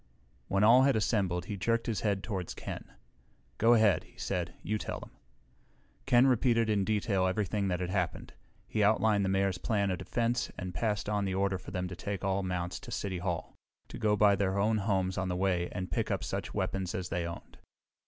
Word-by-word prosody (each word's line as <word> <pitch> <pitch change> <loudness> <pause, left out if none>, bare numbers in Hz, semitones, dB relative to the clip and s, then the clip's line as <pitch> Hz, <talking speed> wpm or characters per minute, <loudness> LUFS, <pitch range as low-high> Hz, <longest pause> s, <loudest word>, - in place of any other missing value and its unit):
When 100 +1 +1
all 120 +4 +7
had 135 0 +4
assembled 95 -5 0
he 100 +1 -4
jerked 115 +5 0
his 110 -4 -2
head 100 -3 0
toward 95 -6 -4
Ken. - - -7 0.7
"Go 115 +2 +6
ahead," 110 -4 +4
he - - -23
said. - - -3
"You 105 +2 -1
tell - - -4
them." - - -12 1.0
Ken 125 -1 +6
repeated 115 -3 +3
in 100 -2 +2
detail 100 -2 +1
everything 100 +1 0
that 90 -1 -1
had 90 0 -2
happened. 100 - -2 0.3
He 110 - -1
outlined 105 -1 +3
the 95 - 0
Mayor's 95 -1 +1
plan 100 -2 0
of 90 - -2
defense 120 +1 -1
and 90 0 -5
passed 105 +5 -1
on 105 -1 0
the 95 -1 -1
order 95 -1 0
for - - -10
them 90 -1 -3
to 90 - -7
take 100 +2 -4
all 95 0 +1
mounts 90 -1 -3
to - - -11
City 95 -3 -3
Hall, 85 -2 -3 0.3
to - - -8
go 105 -2 +3
by 105 -1 +5
their 95 0 0
own 110 +2 +2
homes 95 -2 0
on 95 - -1
the 90 - -1
way 90 -2 0
and 90 0 -5
pick - - -1
up - - -1
such - - -3
weapons 95 -2 -2
as 90 -1 -3
they 85 -1 -1
owned. 85 - -9
100 Hz, 210 wpm, -31 LUFS, 95-110 Hz, 1.0 s, all